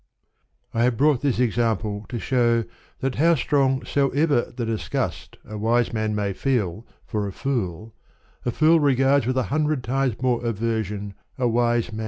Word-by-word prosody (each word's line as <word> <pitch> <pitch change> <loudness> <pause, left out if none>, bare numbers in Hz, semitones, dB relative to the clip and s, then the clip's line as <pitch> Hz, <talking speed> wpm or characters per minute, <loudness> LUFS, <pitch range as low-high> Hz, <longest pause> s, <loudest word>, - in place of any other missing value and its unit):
I 115 - 0
have 125 -2 +1
brought 145 -1 +3
this 140 -4 0
example 110 -3 0
to 120 - -3
show 120 -1 +2 0.4
that, 135 -1 0
how 170 +1 +5
strong 135 -1 +1
soever 140 -1 +2
the 120 -1 -4
disgust 110 -1 -3
a 105 0 -7
wise 115 +2 +1
man 110 -1 -1
may 100 -1 -1
feel 110 -4 -1 0.2
for 105 -2 -2
a - - -4
fool, 110 - -3 0.5
a - - -1
fool 155 +6 +4
regards 135 -2 +3
with 130 0 0
a 130 - +2
hundred 150 -3 +1
times 130 -2 -1
more 125 -1 0
aver 115 -1 -1
sion 100 0 -6 0.2
a 125 -2 +1
wise 120 0 +1
man. 110 - -5
120 Hz, 170 wpm, -23 LUFS, 110-135 Hz, 0.5 s, how